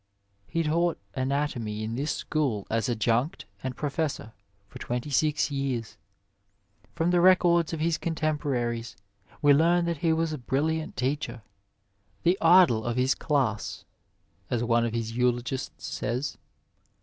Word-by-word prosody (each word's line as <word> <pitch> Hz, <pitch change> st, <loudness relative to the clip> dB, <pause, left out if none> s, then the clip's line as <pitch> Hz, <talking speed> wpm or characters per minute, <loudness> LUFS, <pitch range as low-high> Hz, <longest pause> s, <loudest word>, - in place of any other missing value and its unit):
He 165 Hz, -, -1 dB
taught 165 Hz, +2 st, +1 dB, 0.2 s
anatomy 130 Hz, -5 st, -2 dB
in 110 Hz, +1 st, -3 dB
this 140 Hz, +6 st, -2 dB
school 130 Hz, -10 st, -1 dB
as 115 Hz, +2 st, 0 dB
adjunct 120 Hz, +5 st, 0 dB, 0.2 s
and 130 Hz, -1 st, -4 dB
professor 145 Hz, -6 st, -3 dB, 0.3 s
for -, -, -11 dB
twenty 125 Hz, +4 st, -3 dB
six 150 Hz, +1 st, +1 dB
years. 135 Hz, -5 st, -2 dB, 1.0 s
From 165 Hz, +2 st, +1 dB
the 175 Hz, -1 st, +4 dB
records 175 Hz, -2 st, +5 dB
of 165 Hz, -, -3 dB
his 165 Hz, 0 st, +1 dB
contem 155 Hz, -2 st, -1 dB
poraries 120 Hz, -4 st, -2 dB, 0.5 s
we 145 Hz, -1 st, +7 dB
learn 170 Hz, +4 st, +4 dB
that 170 Hz, -1 st, -1 dB
he 165 Hz, +2 st, +1 dB
was 160 Hz, 0 st, 0 dB
a 150 Hz, -, -4 dB
brilliant 155 Hz, +5 st, -1 dB
teacher, 125 Hz, -2 st, -2 dB, 0.4 s
" 100 Hz, 0 st, -41 dB
the 175 Hz, +2 st, +4 dB
idol 165 Hz, -10 st, +6 dB
of 120 Hz, +1 st, -2 dB
his 130 Hz, +2 st, +3 dB
class," 130 Hz, -9 st, -1 dB, 0.6 s
as 120 Hz, -1 st, 0 dB
one 115 Hz, 0 st, +2 dB
of 115 Hz, -, -3 dB
his 115 Hz, 0 st, -3 dB
eulogists 125 Hz, +2 st, -1 dB
says. 125 Hz, +4 st, -3 dB
140 Hz, 145 wpm, -27 LUFS, 120-160 Hz, 1.0 s, we